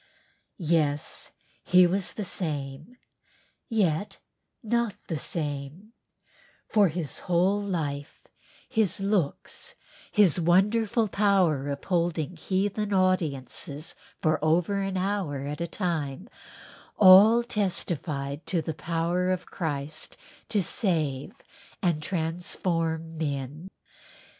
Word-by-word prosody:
Yes 155 -4 0 0.3
he 180 0 +6
was 185 +2 0
the 210 - -4
same, 150 - -4 0.7
yet 200 -5 0 0.5
not 235 -1 0
the 160 -4 -2
same, 150 +8 -4 0.7
for 210 -2 +4
his 160 -3 -4
whole 185 +4 +3
life, 150 -7 -3 0.5
his 220 -6 +1
looks, 195 -7 -2 0.4
his 195 -6 +4
wonderful 210 +6 +3
power 190 -9 +2
of 140 0 -4
holding 170 -2 0
heathen 200 +4 -1
audiences 155 -5 0 0.3
for 155 -1 +2
over 175 +5 +2
an 195 -1 -2
hour 185 -7 -1
at 150 +3 -4
a 170 - -1
time 170 - -2 0.7
all 210 +5 +8
testified 165 - -2
to 180 - +1
the 160 - -3
power 170 +3 -1
of 185 -1 -1
Christ 150 -3 -4 0.3
to 205 -3 +2
save 155 - -1 0.5
and 170 -4 +1
transform 165 -1 -2
men. 145 +3 -3
175 Hz, 100 wpm, -27 LUFS, 155-195 Hz, 0.7 s, all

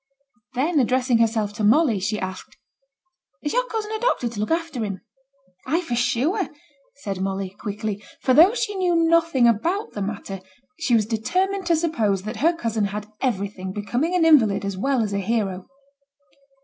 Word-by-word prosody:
Then, 300 +5 +1
addressing 250 -1 +2
herself 220 -2 +1
to 210 - -4
Molly, 230 0 +4
she 210 +3 -1
asked, 190 0 -7 0.9
'Has 295 - -2
your - - +1
cousin 435 -2 -4
a 440 - -2
doctor 480 - +1
to 225 -3 -8
look 210 - -1
after 330 -7 -1
him?' 195 -3 -4 0.7
'Ay, 325 +6 +1
for 320 -9 -5
sure!' 290 - 0 0.5
said 200 -9 -5
Molly, 195 0 -2
quickly; 205 0 -5 0.2
for 255 - +2
though 345 - +7
she 460 -4 -1
knew 365 -3 +1
nothing 330 -6 +3
about 345 - 0
the 205 - -6
matter, 195 -1 -5 0.4
she 255 -7 +2
was 215 -2 +3
determined 370 - -1
to 340 - +4
suppose 225 - 0
that 215 +3 -5
her 330 +5 +3
cousin 225 -8 -1
had 210 +1 -5
everything 200 -6 -2
becoming 245 - -1
an 345 -2 +3
invalid 220 -11 +4
as 200 -1 -3
well 255 +4 +1
as 205 -2 -3
a 200 - 0
hero. 195 -3 -2
235 Hz, 175 wpm, -23 LUFS, 205-330 Hz, 0.9 s, though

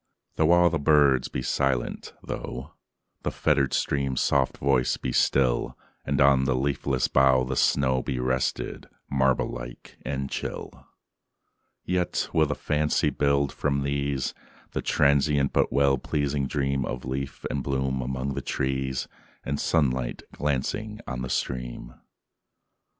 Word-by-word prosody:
Though 80 0 +2
all 85 -1 +5
the 85 - 0
birds 70 -4 +4
be 65 - -4
silent,—thoughThe 65 -1 -4
fettered 70 -1 +1
stream's 70 -2 0
soft 70 -2 +1
voice 65 -3 +2
be - - -3
still, 65 -3 +2 0.3
And 70 0 -1
on 70 -1 +5
the 65 -1 +1
leafless 65 -1 0
bough 65 -1 +4
the 65 +1 -3
snowBe 65 -1 +1
rested, 65 +1 -2 0.2
marble 65 -2 +2
like - - -9
and 70 -1 -3
chill,—Yet 90 +5 -6
will 80 -1 +4
the 70 - -2
fancy 75 0 +1
build, 70 -1 +1
from 70 -1 0
these, 70 -1 -1 0.4
The - - -2
transient 70 0 +2
but - - +2
well 70 -1 +3
pleasing 70 -1 -1
dreamOf 70 -3 -2
leaf 65 +1 -4
and 70 - -1
bloom 65 -1 -1
among 65 +2 -3
the - - -3
trees, 65 -1 -2 0.4
And 70 +1 -2
sunlight 65 -6 0
glancing 100 +10 -2
on 65 -1 -4
the 65 - -4
stream. - - -3
70 Hz, 125 wpm, -26 LUFS, 65-70 Hz, 0.4 s, all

